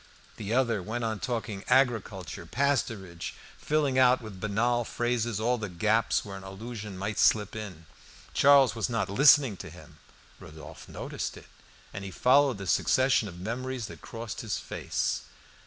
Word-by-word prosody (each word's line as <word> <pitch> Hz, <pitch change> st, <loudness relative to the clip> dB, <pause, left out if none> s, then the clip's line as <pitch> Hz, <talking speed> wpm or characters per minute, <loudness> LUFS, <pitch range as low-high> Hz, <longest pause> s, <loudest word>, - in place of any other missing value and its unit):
The 105 Hz, -1 st, -5 dB
other 120 Hz, -4 st, +2 dB
went 110 Hz, +6 st, -4 dB
on 110 Hz, -2 st, -2 dB
talking 110 Hz, -5 st, -3 dB
agriculture, 110 Hz, -, +1 dB
cattle, -, -, -23 dB, 0.2 s
pasturage, 95 Hz, -9 st, -4 dB, 0.3 s
filling 145 Hz, -4 st, +1 dB
out 125 Hz, 0 st, +5 dB
with 110 Hz, -5 st, -10 dB
banal 115 Hz, +4 st, +1 dB
phrases 120 Hz, -2 st, -1 dB
all 120 Hz, +2 st, +1 dB
the 105 Hz, -2 st, -4 dB
gaps 110 Hz, +6 st, +1 dB
where 100 Hz, -1 st, -7 dB
an 95 Hz, -, -10 dB
allusion 105 Hz, +1 st, -7 dB
might 100 Hz, +2 st, -3 dB
slip 105 Hz, -1 st, +3 dB
in. 95 Hz, -7 st, -7 dB, 0.5 s
Charles 140 Hz, -2 st, +6 dB
was 115 Hz, 0 st, -2 dB
not 105 Hz, -5 st, -1 dB
listening 135 Hz, -2 st, +6 dB
to -, -, -8 dB
him; -, -, -15 dB, 0.4 s
Rodolphe 75 Hz, 0 st, -12 dB
noticed -, -, -5 dB
it, -, -, -13 dB, 0.5 s
and 95 Hz, -, -6 dB
he 100 Hz, -, -5 dB
followed 130 Hz, +4 st, +3 dB
the 100 Hz, -, -7 dB
succession 130 Hz, +4 st, +3 dB
of 90 Hz, -3 st, -9 dB
memories 125 Hz, +4 st, -4 dB
that 105 Hz, -, -10 dB
crossed 115 Hz, +1 st, -6 dB
his 110 Hz, -4 st, -2 dB
face. -, -, -2 dB
110 Hz, 160 wpm, -28 LUFS, 100-125 Hz, 0.5 s, Charles